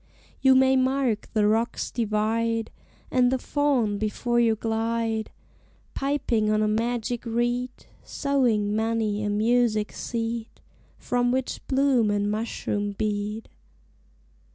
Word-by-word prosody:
You 265 -1 +6
may 265 0 +5
mark 260 -4 +1
the 210 -2 +3
rocks 225 +3 0
divide, 225 0 0 0.4
And 250 -1 +3
the 260 - +2
faun 255 -7 0
before 240 +3 0
you 230 -2 +3
glide, 225 0 -1 0.6
Piping 270 -6 0
on 215 0 +2
a - - +2
magic 235 +2 -1
reed, 240 +2 -1 0.3
Sowing 235 -8 0
many 220 -1 0
a 210 - -1
music 215 0 +1
seed, 230 -1 -4 0.4
From 245 0 0
which 260 0 -2
bloom 265 -5 +3
and 205 0 0
mushroom 205 -2 -2
bead. 210 +1 -3
230 Hz, 115 wpm, -25 LUFS, 215-245 Hz, 0.6 s, You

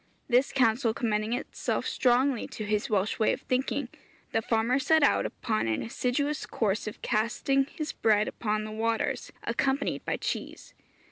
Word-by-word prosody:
This 250 +2 +3
counsel 235 -2 +2
commending 215 -1 0
itself 250 - -2
strongly 250 0 +2
to 215 - -6
his 210 +5 0
Welsh 210 0 0
way 220 - +3
of - - -5
thinking, 260 +1 -1 0.4
the 225 - +1
farmer 230 +4 +1
set 315 +3 +3
out - - +3
upon 215 - -2
an 110 -1 0
assiduous 275 +5 -1
course 210 -1 -1
of 215 - -7
casting 245 +5 +1
his 310 -2 -3
bread 215 -1 +2
upon 215 -1 -2
the 215 - -6
waters 225 +1 -1
accompanied 270 +1 0
by - - -1
cheese. - - -5
230 Hz, 155 wpm, -28 LUFS, 215-270 Hz, 0.4 s, This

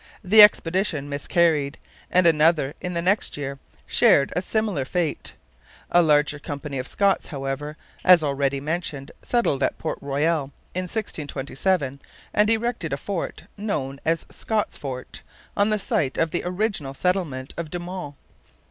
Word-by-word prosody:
The 210 +3 +8
expedition 180 -7 +4
miscarried; 145 0 +1 0.3
and 185 0 +3
another 155 -3 +4
in 180 -1 -4
the 170 - -1
next 195 -1 +1
year 140 -1 -5 0.3
shared 140 - +4
a 180 - +1
similar 210 -7 -1
fate. 165 +3 -2 0.6
A 175 - +6
larger 150 -2 +3
company 145 -1 -5
of 130 - -4
Scots, 200 -1 +1
however, 145 +1 -4 0.3
as 180 -3 +7
already 140 -1 0
mentioned, 150 -2 -3
settled 230 - 0
at - - +1
Port 160 - -4
Royal 145 +2 0 0.3
in 185 +1 -2
1627 145 - -2 0.3
and 210 +1 +3
erected 225 - -1
a - - -1
fort, 190 +4 -4
known 145 -11 -3
as 165 0 0
Scots 220 -2 -2
Fort, 130 -3 -7 0.3
on 205 +1 +2
the 215 - +2
site 195 - -1
of 165 -1 +1
the 175 - -1
original 180 -7 -2
settlement 160 -7 -1
of 165 -2 -5
De 175 - -3
Monts. 175 -4 -6
160 Hz, 150 wpm, -24 LUFS, 140-185 Hz, 0.6 s, The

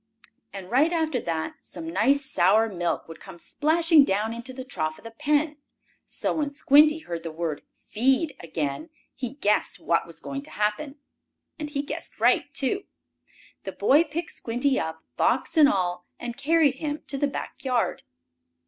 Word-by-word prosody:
And 195 -2 -9
right 290 +7 +4
after 320 -6 0
that, 165 -6 -3
some 160 - -8
nice 275 +9 +3
sour 215 0 +3
milk 175 -3 -2
would 165 - -10
come 190 -3 -11
splashing 320 - +3
down 215 0 0
into 235 +3 -5
the 260 0 -7
trough 155 - -3
of - - -17
the 230 - -8
pen. 300 +3 0 0.5
So - - -2
when 300 -2 -1
Squinty 295 +2 +5
heard 170 - -5
the 165 -1 -6
word 160 -2 -3
"feed" 265 +7 0
again, 160 - -4 0.2
he 255 0 -5
guessed 210 -7 +1
what 170 - +1
was 165 - -8
going 140 -1 -5
to - - -15
happen. 215 +8 -2 0.6
And 300 -1 -4
he 285 -1 -2
guessed 290 - -5
right, - - +3
too. 350 +8 0 0.8
The - - -6
boy 295 +5 +4
picked 330 +1 -5
Squinty 250 +4 0
up, 160 0 -4
box - - +1
and 300 -3 +7
all, 180 -2 -1
and 240 -1 -5
carried 290 -1 +3
him 300 -1 -3
to 275 - -3
the 285 - +2
back 275 - -6
yard. 250 -3 0
255 Hz, 170 wpm, -26 LUFS, 180-295 Hz, 0.8 s, and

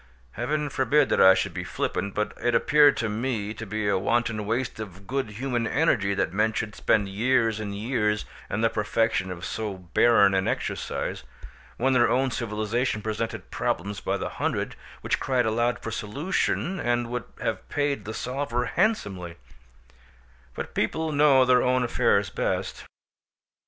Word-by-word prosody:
Heaven 150 - -2
forbid 140 +2 +2
that - - +3
I 95 0 +8
should - - -1
be - - -4
flippant, 100 -1 -3
but 105 - -1
it 120 -1 +1
appeared 150 -1 +5
to 115 - -1
me 110 -1 -2
to 115 -1 -8
be 105 +1 -2
a 100 - +2
wanton 110 0 0
waste 115 +1 -2
of 100 -2 -8
good 135 0 -2
human 120 +1 -2
energy 100 -12 +2
that 95 - -1
men 105 +3 +2
should 105 -1 -3
spend 105 -2 +1
years 115 +2 +1
and 100 -2 -4
years 105 -2 0 0.2
in 105 - -2
the 115 - +3
perfection 110 -2 0
of 90 -1 -6
so 110 -3 -3
barren 100 +3 +4
an 95 0 +1
exercise, - - -3 0.5
when 130 +2 +2
their 120 -2 +4
own 130 +1 +2
civilisation 110 0 -1
presented 110 +1 -4
problems 100 +2 -2
by - - -1
the - - -4
hundred - - -1 0.3
which - - 0
cried 125 -3 +1
aloud 120 +2 +1
for 115 - -6
solution 165 - -1
and 120 -3 0
would 125 -1 -3
have - - -3
paid 145 -1 -1
the 110 - -5
solver 125 -1 -2
handsomely; 100 - -1 1.2
but - - -6
people 160 0 -1
know 145 -3 +5
their 125 -1 +5
own 125 0 +2
affairs 120 - +2
best. - - -2
115 Hz, 160 wpm, -26 LUFS, 105-130 Hz, 1.2 s, I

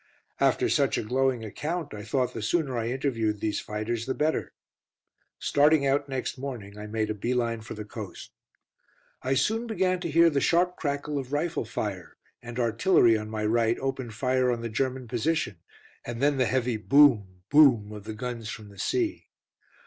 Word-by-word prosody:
After - - +3
such - - +2
a - - -1
glowing 125 0 0
account, 155 - -4
I 105 - -6
thought 125 +4 -1
the 115 - -5
sooner 140 +3 0
I 115 -1 -1
interviewed 115 -5 -1
these 105 0 -1
fighters 110 +2 -3
the 130 - -1
better. 155 +1 0 0.9
Starting 145 0 +3
out 140 +1 +1
next 130 0 -3
morning, 120 -7 -6
I 105 0 -7
made 110 0 -1
a - - 0
bee 120 +4 -2
line 115 -2 -1
for 110 - -8
the 105 0 -7
coast. 105 -2 -8 0.9
I 130 +1 0
soon 220 - +1
began 185 -5 +1
to 175 -1 -3
hear 165 +2 +5
the 140 -2 +1
sharp 180 +1 +2
crackle 145 -1 -2
of 130 -1 -7
rifle 155 -1 -1
fire, 100 -4 -5 0.2
and 120 0 -8
artillery 115 - +4
on 110 0 -3
my 110 -1 -3
right 115 +1 +2
opened 130 -4 -4
fire 130 +1 +1
on 120 -1 -2
the 115 - -4
German 130 +2 -2
position, 120 - -1 0.4
and 120 -1 -6
then 140 +1 +2
the 130 - +2
heavy 125 -3 0
boom, 105 -8 +4
boom 130 -8 +6
of 105 -1 -9
the 110 0 -6
guns 120 -2 -5
from 110 -3 -8
the 100 -1 -15
sea. 335 - -1
125 Hz, 185 wpm, -27 LUFS, 110-140 Hz, 0.9 s, boom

